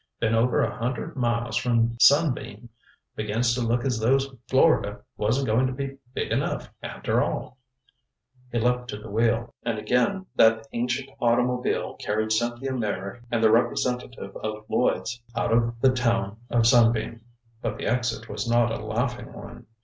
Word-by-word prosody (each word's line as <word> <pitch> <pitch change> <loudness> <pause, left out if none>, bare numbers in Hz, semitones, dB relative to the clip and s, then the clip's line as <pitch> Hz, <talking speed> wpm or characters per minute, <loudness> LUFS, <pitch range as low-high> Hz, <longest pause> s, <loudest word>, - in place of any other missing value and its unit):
Been 115 -1 +1
over 115 +2 +3
a - - -2
hundred 130 +7 -3
miles 120 -2 -1
from 115 -2 +1
Sunbeam. 125 -7 +3 0.5
Begins 115 +3 0
to 125 - -1
look 120 +1 0
as 125 -4 0
though 120 +5 +4 0.3
Florida 130 -6 +3
wasn't 115 +6 0
going 120 +4 +2
to 130 - -3
be 135 0 -5 0.2
big - - -2
enough, - - -1
after - - -1
all." 130 - -3 0.9
He 120 - -1
leaped 125 +1 +1
to 105 - -5
the 105 0 -10
wheel, 115 +2 +1
and 115 -2 -2
again 125 - +1
that 110 0 +4
ancient 125 +3 -2
automobile 125 +1 +1
carried 110 +1 -1
Cynthia 120 +4 0
Meyrick 105 -2 -3
and 115 -1 0
the 110 - +6
representative 125 +2 0
of 110 0 -5
Lloyds 120 +1 0
out 115 0 0
of 115 0 +1
the 130 - +5
town 115 -5 0
of 120 -1 +2
Sunbeam. 115 -1 +3 0.4
But - - -3
the - - -5
exit 120 -1 -1
was 105 +2 -4
not 120 -1 +3
a - - -4
laughing - - -2
one. - - -11
120 Hz, 160 wpm, -25 LUFS, 115-125 Hz, 0.9 s, the